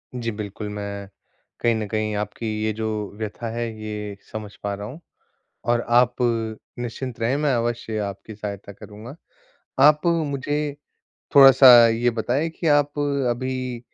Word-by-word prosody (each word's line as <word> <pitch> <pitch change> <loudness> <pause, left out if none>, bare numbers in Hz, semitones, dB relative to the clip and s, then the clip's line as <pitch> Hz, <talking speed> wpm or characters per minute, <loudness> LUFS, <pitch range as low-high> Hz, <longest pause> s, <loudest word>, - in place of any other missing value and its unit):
जी, 115 -2 -2
बिल्कुल, 105 0 -6
मैं 100 -1 -6 0.5
कहीं 120 -1 +2
न 110 -1 -3
कहीं 110 0 -2
आपकी 105 +2 -4 0.2
ये 110 - +1
जो 110 +1 -4 0.3
व्यथा 110 +1 -5
है, 120 0 -2
ये 105 -2 -5
समझ 105 -2 -7
पा 100 0 -2
रहा 100 +1 -6
हूँ 145 +7 -9 0.7
और 120 0 +3
आप 120 +1 +4 0.6
निश्चिंत 120 +1 -5
रहें 120 +5 +1
मैं 145 -3 +1
अवश्य 115 -2 -2
आपकी 100 +1 -5
सहायता 100 -1 -7
करूँगा। 105 +7 -11 0.7
आप 150 +3 +5
मुझे 145 -2 -1 0.6
थोड़ा-सा 135 -1 +9 0.2
ये 115 +2 +2
बताएँ 125 +7 -1
कि 165 +1 -4
आप 145 0 +2 0.3
अभी 130 0 -3
115 Hz, 140 wpm, -23 LUFS, 105-130 Hz, 0.7 s, थोड़ा-सा